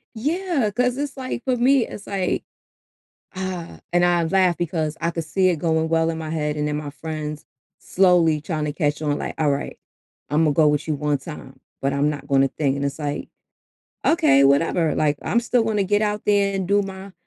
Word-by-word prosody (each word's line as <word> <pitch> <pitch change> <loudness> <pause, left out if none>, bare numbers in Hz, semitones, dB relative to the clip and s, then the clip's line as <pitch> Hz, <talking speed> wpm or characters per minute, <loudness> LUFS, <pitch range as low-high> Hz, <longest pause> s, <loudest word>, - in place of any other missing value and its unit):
Yeah, 305 - 0
'cause 250 +1 +1
it's 285 -1 -3
like 255 -3 -5
for 260 -1 +2
me, 255 +1 +3
it's 205 - -9
like 195 -2 -1 0.9
uh, 185 -3 -5
and 175 0 +3
I 175 -1 +3
laugh 180 0 +2
because 160 -2 -2
I 170 0 0
could 165 -1 -4
see 185 +4 +2
it 175 - 0
going 160 0 0
well 165 0 +2
in 160 - -4
my 155 -1 -5
head 150 -2 -2
and 150 0 -1
then 150 0 -1
my 150 -1 -5
friends 150 0 -6 0.3
slowly 175 -5 +3
trying 155 0 -3
to 150 - -2
catch 150 -1 -1
on 145 -1 0
like, - - -5
"Alright. 145 -2 -1 0.5
Imma 150 0 +3
go 155 +1 +4
with 150 +1 0
you 155 - +1
1 145 0 0
time, 135 -1 -10 0.2
but 135 +1 0
I'm 140 +2 +1
not 150 - -6
gonna 135 0 +3
think," 140 0 -1
and 140 - -2
it's 140 +1 -3
like, 145 -1 -4 0.8
"Okay, 315 - +4
whatever. 155 +3 +3
Like, 145 -2 +1
I'm 235 - +1
still 240 0 +1
gonna 215 -3 0
get 205 +2 +1
out 210 0 -1
there 200 -1 +2
and 190 -2 -2
do 200 +2 +3
my 195 0 -8
165 Hz, 205 wpm, -22 LUFS, 150-200 Hz, 0.9 s, go